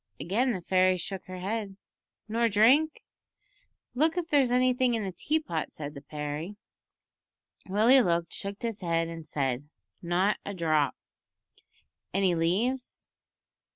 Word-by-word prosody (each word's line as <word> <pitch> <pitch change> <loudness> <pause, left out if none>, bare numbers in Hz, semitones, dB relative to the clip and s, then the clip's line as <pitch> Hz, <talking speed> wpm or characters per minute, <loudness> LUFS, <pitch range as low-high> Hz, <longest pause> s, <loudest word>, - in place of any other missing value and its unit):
Again 235 +9 +1
the 185 - -5
fairy 185 0 +3
shook 190 +2 -5
her 185 0 -7
head. 195 +1 -4 0.5
"Nor 230 +1 +1
drink?" 255 +10 +4 0.9
"Look 315 +6 +2
if 340 -1 -2
there's 275 -4 +3
anything 250 -1 +3
in 220 - -2
the 190 - -3
tea 300 - 0
pot," 165 - -4
said 145 -1 -7
the 140 - -9
fairy. 150 +5 -5 1.1
Willie 225 +7 +5
looked, 170 -4 0
shook 200 +2 -6
his 225 -3 -3
head, 165 -1 0
and 165 -2 -8
said, 135 -1 -2 0.3
"Not 185 +4 +1
a 200 - -5
drop." 155 -5 +1 1.2
"Any 195 -2 +3
leaves?" 210 +11 -1
195 Hz, 135 wpm, -28 LUFS, 165-240 Hz, 1.2 s, Willie